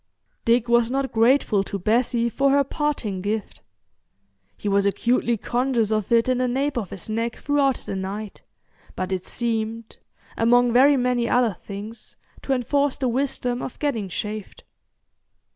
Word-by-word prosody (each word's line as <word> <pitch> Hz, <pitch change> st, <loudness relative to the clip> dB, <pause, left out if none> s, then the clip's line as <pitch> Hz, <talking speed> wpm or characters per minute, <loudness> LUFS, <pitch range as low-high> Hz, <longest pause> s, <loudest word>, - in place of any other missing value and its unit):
Dick 235 Hz, 0 st, +3 dB
was 235 Hz, -1 st, +3 dB
not 270 Hz, +1 st, -1 dB
grateful 230 Hz, -2 st, +3 dB
to 200 Hz, -, -4 dB
Bessie 235 Hz, +4 st, +1 dB
for 275 Hz, +4 st, +1 dB
her 280 Hz, +1 st, +4 dB
parting 275 Hz, -, -2 dB
gift. 210 Hz, +1 st, -3 dB, 1.0 s
He -, -, -6 dB
was 200 Hz, 0 st, +3 dB
acutely 235 Hz, +3 st, +1 dB
conscious 240 Hz, -1 st, 0 dB
of 215 Hz, -1 st, -1 dB
it 230 Hz, 0 st, +4 dB
in 255 Hz, -1 st, +1 dB
the 255 Hz, -, +1 dB
nape 270 Hz, +3 st, -1 dB
of 215 Hz, -7 st, -3 dB
his 190 Hz, -, -7 dB
neck 230 Hz, +1 st, -2 dB
throughout 280 Hz, -2 st, +1 dB
the 195 Hz, -, -6 dB
night, 195 Hz, +2 st, -5 dB, 0.5 s
but 185 Hz, 0 st, -3 dB
it 185 Hz, -1 st, -3 dB
seemed, 225 Hz, -1 st, -3 dB, 0.4 s
among 245 Hz, +1 st, +3 dB
very 275 Hz, +3 st, +6 dB
many 245 Hz, -1 st, +1 dB
other 245 Hz, -4 st, +3 dB
things, 215 Hz, +3 st, -8 dB, 0.2 s
to 270 Hz, -, -1 dB
enforce 280 Hz, +2 st, +1 dB
the 260 Hz, -, -1 dB
wisdom 250 Hz, -1 st, -1 dB
of -, -, -6 dB
getting 230 Hz, -10 st, -2 dB
shaved. 210 Hz, +2 st, -6 dB
235 Hz, 155 wpm, -23 LUFS, 215-255 Hz, 1.0 s, very